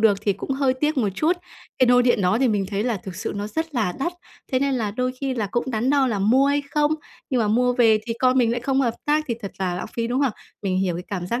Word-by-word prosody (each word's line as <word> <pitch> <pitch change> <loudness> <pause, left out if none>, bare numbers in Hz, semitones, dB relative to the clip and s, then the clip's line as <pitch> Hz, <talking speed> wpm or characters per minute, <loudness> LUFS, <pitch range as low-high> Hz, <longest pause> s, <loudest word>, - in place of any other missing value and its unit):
được 210 -3 +4
thì 205 -1 +1
cũng 195 - -7
hơi 270 -1 +2
tiếc 300 +4 0
một 230 -6 +2
chút. 320 - +1 0.4
Cái 255 - +5
nôi 245 0 +5
điện 240 -3 +3
đó 185 +4 +2
thì 260 0 +3
mình 205 -3 0
thấy 200 +1 -1
là 240 -3 0
thực 185 -1 -8
sự 220 +4 -3
nó 205 +1 -3
rất 320 +7 -4
là 215 -7 +1
đắt. 345 +6 -1 0.4
Thế 255 - +3
nên 275 0 +1
là 220 -5 -1
đôi 250 +4 -1
khi 270 -1 -1
là 220 -4 -1
cũng 240 +6 -2
đắn 235 +3 0
đo 280 -2 +3
là 220 -5 -1
mua 240 +8 +4
hay 285 +1 +1
không, 300 +1 +2 0.4
nhưng 255 -3 +2
mà 215 - +1
mua 245 +3 +3
về 230 -3 +4
thì 230 - -1
con 255 0 +4
mình 235 -2 +3
lại 240 - -1
không 270 +2 +1
hợp 235 -4 +1
tác 300 +1 +2
thì 235 - 0
thật 200 - -5
là 185 -2 -1
lãng 180 - -4
phí, 230 -1 -1
đúng 250 +3 0
không? 270 -5 +2 0.3
Mình 185 -2 0
hiểu 185 -2 0
cái 175 - -6
cảm 180 -3 -3
giác 235 +6 -1
240 Hz, 300 wpm, -23 LUFS, 205-265 Hz, 0.4 s, Cái